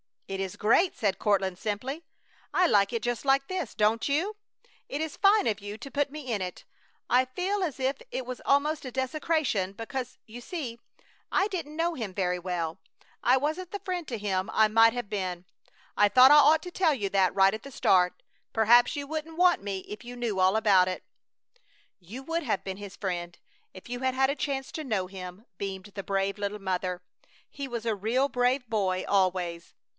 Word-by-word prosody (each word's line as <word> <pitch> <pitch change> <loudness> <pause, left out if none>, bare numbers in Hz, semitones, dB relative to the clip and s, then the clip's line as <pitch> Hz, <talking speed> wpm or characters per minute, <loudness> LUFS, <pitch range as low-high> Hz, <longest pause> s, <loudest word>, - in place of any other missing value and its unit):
"It 195 0 -4
is 190 -1 -3
great!" 285 - +3
said 200 -3 0
Courtland, 195 -3 +1
simply. 250 +9 -4 0.5
"I 365 - +4
like 205 - +3
it 230 -2 -2
just 240 -2 -2
like 275 0 +3
this. 365 - -4
Don't 215 +2 +2
you? 350 +10 0 0.5
It 285 - -3
is 315 -2 -4
fine 410 +1 +5
of 215 -3 0
you 205 +1 -7
to 275 - -9
put 285 +1 0
me 285 -3 -7
in 210 -4 -1
it. 180 -1 -5 0.5
I 255 +1 +4
feel 370 +10 -2
as 300 -7 -2
if 265 +2 0
it 260 - -3
was 255 0 -6
almost 295 +2 +2
a 255 - -5
desecration, 260 - 0
because, 250 +4 -5
you 230 +2 -10
see, 245 -4 -6 0.5
I 390 +2 +2
didn't 330 -6 -5
know 335 +1 0
him 220 -8 -5
very 180 -2 0
well; 170 -3 -3 0.4
I 250 - +4
wasn't 315 +6 -2
the 405 - -4
friend 360 -4 -3
to 235 - -3
him 195 -3 -1
I 215 0 +4
might 225 +1 +6
have 245 -4 -4
been. 185 -4 -3 0.5
I 205 - +6
thought 255 +6 +7
I - - +9
ought 300 +2 +6
to 360 - -7
tell 345 -4 +2
you 205 -6 -2
that 190 -2 +2
right 195 0 +5
at 220 - -6
the 275 - -9
start. 180 -8 +2 0.3
Perhaps 235 +5 +5
you 285 -1 -4
wouldn't 315 +2 -5
want 360 0 +4
me 200 -1 -3
if 210 +4 -10
you 245 +1 -8
knew 235 -5 -2
all 185 +2 +4
about 200 -4 +4
it." 185 - -4 1.0
"You 210 +9 -9
would 330 +4 -2
have 220 -7 -1
been 190 -1 -5
his 200 -2 -9
friend 175 -3 -4 0.4
if 185 - -12
you 245 0 -4
had 260 0 0
had 265 0 +3
a - - -3
chance 270 -2 -3
to 315 - -5
know 210 -7 0
him," 185 +2 -9
beamed 195 0 -5
the 195 - -5
brave 195 +1 -1
little 205 +1 -3
mother. 180 -1 -2 0.5
"He 280 -1 -6
was 235 -3 -5
a 225 - +1
real 235 +7 +1
brave 250 +1 +1
boy 190 -4 0
always!" 180 -3 0
230 Hz, 205 wpm, -28 LUFS, 195-280 Hz, 1.0 s, I